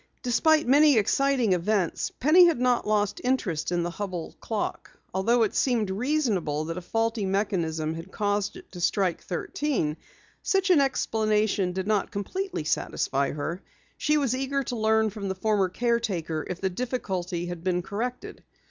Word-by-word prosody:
Despite 305 +5 +3
many 285 0 +6
exciting 250 0 +2
events, 180 0 0
Penny 325 +7 +7
had 330 -8 +1
not 250 -2 +1
lost 210 -1 0
interest 195 -12 0
in 175 -1 +1
the 175 - -2
Hubell 180 -2 -5
clock. 220 -2 -3 0.2
Although 230 +6 +3
it 215 - 0
seemed 230 -7 +1
reasonable 205 - 0
that 165 +2 -4
a - - -11
faulty 225 +3 -1
mechanism 170 -5 -1
had 165 +3 -8
caused 205 - -1
it 365 0 -13
to 175 - -8
strike 180 0 +1
thirteen, 175 - -2 0.4
such 385 -1 +2
an 320 -6 +6
explanation 215 -7 +1
did 190 +1 -3
not 210 -2 +1
completely 365 - -3
satisfy 140 -2 0
her. 160 +5 -4 0.3
She 300 0 +1
was 270 -4 +1
eager 270 +1 -1
to 245 - -4
learn 220 -1 +2
from 200 -1 -5
the 190 - -2
former 200 -1 +1
caretaker 195 -8 -1
if 180 - -4
the 190 -1 -1
difficulty 185 -6 -3
had 175 -1 -6
been 180 -1 0
corrected. 240 +7 -5
210 Hz, 160 wpm, -26 LUFS, 180-250 Hz, 0.4 s, Penny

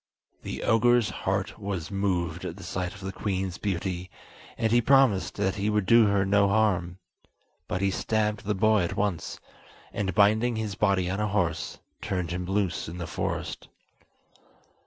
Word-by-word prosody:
The - - -5
ogre's 120 0 +3
heart - - -2
was 100 -3 -4
moved 90 -4 -1
at 85 - -5
the 95 - -10
sight 90 +1 -4
of 100 - -12
the 95 0 -4
queen's 95 -2 -3
beauty, 95 -2 -3 0.5
and 110 -1 0
he 120 +1 +5
promised 130 -6 +3
that 95 -1 -1
he 100 +1 0
would 105 -2 +1
do 115 +1 +6
her 100 -1 +2
no 100 +1 +4
harm; 95 -4 +1 0.7
but 90 - -2
he 100 0 +2
stabbed 105 +2 -1
the 105 +1 0
boy 110 +1 +3
at 85 - -2
once, 100 -6 -2 0.5
and 95 -4 -2
binding 110 +4 +4
his 110 -2 -3
body 95 -3 +1
on 95 +3 -2
a 105 - +1
horse, 90 -6 -1 0.2
turned 90 -3 -2
him 90 0 -3
loose 95 -3 -1
in 85 - -7
the 85 - -4
forest. - - -4
100 Hz, 170 wpm, -27 LUFS, 90-105 Hz, 0.7 s, do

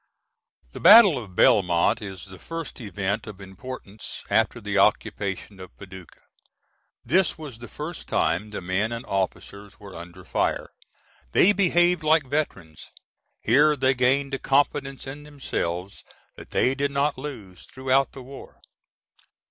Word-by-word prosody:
[The - - -9
battle 200 - +8
of 95 -4 -15
Belmont 95 +4 +3
is 95 -4 -8
the 95 -1 -13
first 165 -5 -7
event 105 0 -3
of 105 -2 -9
importance 100 +2 -9
after - - +2
the - - -1
occupation 95 0 0
of 95 - -12
Paducah. 95 -2 -13 0.8
This 185 +3 +2
was 145 -8 -9
the 120 - -9
first 160 +3 -7
time 85 +7 0
the 105 - -6
men 95 +5 -1
and 115 +1 -5
officers 100 +1 -4
were 100 -2 -12
under 85 +2 -11
fire; - - -1 0.6
they 200 - +6
behaved 175 -2 +3
like 155 -1 +3
veterans. 110 - -4 0.5
Here 145 +6 +4
they 130 -1 +2
gained 135 +2 +1
a 135 - -1
confidence 135 0 0
in 140 +2 -8
themselves 100 -11 -5 0.3
that - - -13
they 130 - +2
did 140 +1 -1
not 140 +1 0
lose 100 - -9
throughout 130 0 0
the 135 - -10
war. 135 +2 -12
125 Hz, 140 wpm, -24 LUFS, 95-145 Hz, 0.8 s, battle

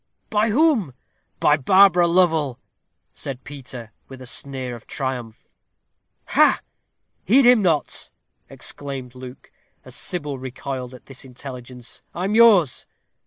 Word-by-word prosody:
"By 215 +1 +2
whom?" 230 - +2 0.4
"By 150 - +4
Barbara 180 +4 +5
Lovel," 160 -7 +2 0.6
said 135 -2 -7
Peter, 125 -5 -9 0.2
with 135 -1 -11
a 130 - -10
sneer 130 0 -3
of 120 - -11
triumph. 125 -5 -5 0.8
"Ha!" - - +4 0.6
"Heed 255 +8 +5
him 245 -2 +6
not," 165 -6 0 0.4
exclaimed 135 -3 -7
Luke, 130 0 -11 0.3
as - - -12
Sybil 145 -6 -3
recoiled 130 0 -6
at 125 - -16
this 135 -1 -9
intelligence. 125 -2 -10
"I 175 - -3
am 195 +2 -1
yours." 215 - +5
140 Hz, 120 wpm, -22 LUFS, 125-180 Hz, 0.8 s, him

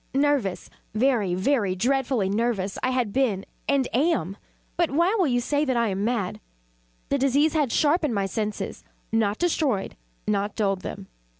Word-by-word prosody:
nervous 275 -9 +1 0.3
very, 220 -6 +2
very 200 -1 +1
dreadfully 250 0 +1
nervous 205 -2 -1
I 255 - +1
had 250 -5 0
been 225 -8 +1 0.2
and 275 -2 +2
am; 250 - +1 0.4
but 345 -2 +2
why 340 +7 +2
will 380 -7 +2
you 245 -2 +2
say 285 +4 0
that 260 -4 0
I 235 -2 +2
am 195 +1 -2
mad? 225 -5 -1 0.7
The 280 - +1
disease 280 +4 +3
had 295 -6 +1
sharpened 300 -3 +2
my 200 -1 +1
senses 210 +2 -3 0.3
not 220 -2 +1
destroyed 295 - 0 0.3
not 205 0 0
dulled 195 -3 0
them. 195 +1 -6
240 Hz, 160 wpm, -25 LUFS, 200-280 Hz, 0.7 s, disease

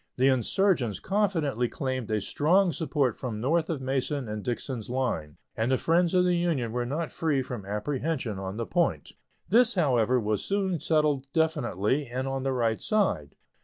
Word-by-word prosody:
The 130 +2 +4
insurgents 130 - +1
confidently 165 - 0
claimed 130 -4 -3
a 105 -1 +1
strong 175 - +2
support 140 -4 0
from 115 -5 -5
north 160 +7 +1
of 155 -5 -2
Mason 135 0 -1
and 105 0 -4
Dixon's 120 -1 -4
line, 100 - -2 0.2
and 115 +3 0
the 130 - +3
friends 170 +4 +2
of 180 - +5
the 180 0 +2
Union 165 -10 0
were 120 +1 -2
not 155 +5 -3
free 150 -5 0
from 120 -6 -7
apprehension 125 +1 -2
on 95 +1 -5
the 115 - -2
point. 90 - 0 0.4
This, 235 +2 +4
however, 125 - +3
was 105 -2 -1
soon 195 -4 0
settled 150 -3 +1
definitely, 145 - 0
and 130 +2 -3
on 135 0 -2
the 135 0 -1
right 115 -4 0
side. 90 - 0
130 Hz, 170 wpm, -27 LUFS, 115-160 Hz, 0.4 s, of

